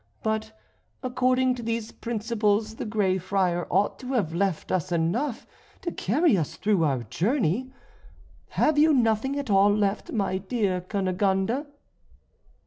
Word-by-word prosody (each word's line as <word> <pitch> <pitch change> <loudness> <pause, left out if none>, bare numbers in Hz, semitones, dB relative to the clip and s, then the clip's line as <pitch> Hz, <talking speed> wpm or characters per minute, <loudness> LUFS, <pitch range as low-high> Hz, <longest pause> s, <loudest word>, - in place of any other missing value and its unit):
But 220 0 -2 0.5
according 255 0 +2
to 250 - -6
these 230 -1 -3
principles 220 -1 -1
the - - -4
Grey 200 -3 +1
Friar 180 -2 0
ought 195 +3 +1
to 260 +1 -5
have 200 -10 0
left 185 -2 -1
us 180 -2 -1
enough 200 - -1 0.4
to 345 - -2
carry 290 - +2
us 160 -6 -2
through 200 -3 +1
our 135 -5 0
journey. 220 - 0 0.9
Have 305 -1 +3
you 310 +1 +5
nothing 240 +3 +1
at 280 -6 -3
all 195 +1 +5
left, 205 0 0
my 195 -4 0
dear 190 -2 -1
Cunegonde?" 195 +6 0
215 Hz, 135 wpm, -26 LUFS, 190-245 Hz, 0.9 s, you